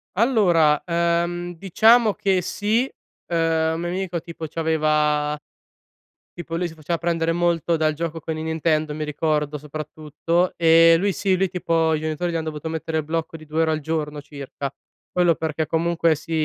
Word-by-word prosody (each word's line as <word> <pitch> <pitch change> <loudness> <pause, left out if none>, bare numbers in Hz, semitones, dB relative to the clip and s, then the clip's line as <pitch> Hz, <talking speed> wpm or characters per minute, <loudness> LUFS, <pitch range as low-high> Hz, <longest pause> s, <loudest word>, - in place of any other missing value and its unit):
Allora, 180 - +3
ehm, 170 +1 0
diciamo 215 +6 +4
che 190 -2 +1
sì, 215 +7 0 0.4
ehm, 165 -1 +1
un - - -4
mio 175 - -2
amico 180 -1 -2
tipo 165 -1 -8
c'aveva 150 -2 +1 1.0
tipo 170 -1 -6
lui 175 +1 -1
si - - -12
faceva 165 +1 -3
prendere 165 0 0
molto 170 -1 +1
dal 155 -1 +1
gioco 165 +1 -4
con 160 +1 -4
i 155 - -4
Nintendo 160 -1 0
mi 155 - -3
ricordo, 150 0 -1
soprattutto. 155 +4 -2
Ehm, 165 0 +6
lui 200 0 +2
sì, 190 0 +1
lui 190 0 0
tipo 165 -2 +1
i 155 - 0
genitori 155 +3 -2
gli - - -4
hanno 160 -1 -2
dovuto 155 0 -5
mettere 160 0 -2
il - - -3
blocco 165 +1 -3
di 155 -1 -10
due 155 +2 -1
ore 160 - +1
al 155 0 -1
giorno 150 -1 -3
circa. 140 -1 -7 0.4
Quello 175 -2 +3
perché 160 0 -2
comunque, 165 0 +1
si, 160 +2 -11
165 Hz, 175 wpm, -22 LUFS, 155-175 Hz, 1.0 s, Ehm